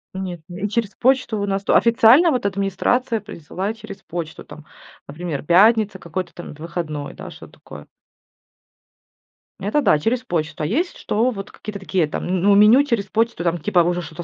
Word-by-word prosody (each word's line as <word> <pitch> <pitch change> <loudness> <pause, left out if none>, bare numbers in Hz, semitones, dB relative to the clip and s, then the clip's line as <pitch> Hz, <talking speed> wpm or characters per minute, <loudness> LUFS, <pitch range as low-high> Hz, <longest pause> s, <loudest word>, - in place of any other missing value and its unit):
Нет. 185 -3 -5
И 185 +3 -4
через 220 -1 -1
почту 255 -3 +1
у 200 - -1
нас 195 0 -1
тут. - - +2
Официально 235 +8 +6
вот 250 -8 -1
администрация 200 +5 0
присылает 205 +1 -6
через 215 -2 -11
почту 165 -2 -6
там, 155 - -13 0.4
например: 155 -1 -5
пятница 205 +5 +4
какой-то 180 +1 -6
там 175 - -9
выходной, 155 -2 -5
да, - - -9
что-то - - -13
такое. 75 0 -13 1.7
Это 205 +10 0
да, 155 - +3
через 240 +9 -1
почту. 160 -7 -3
А - - 0
есть 315 - -1
что, 230 +4 0
вот 195 -3 -8
какие-то 210 -1 -8
такие 190 -4 0
там, 150 - -5
ну 185 +2 +1
ну, 200 - +6
меню 215 +7 +6
через 235 -8 -1
почту, 225 -1 -1
там, 175 0 0
типа, 180 +3 +1
уже 175 +1 +1
что-то 170 +1 -8
195 Hz, 175 wpm, -21 LUFS, 170-225 Hz, 1.7 s, Официально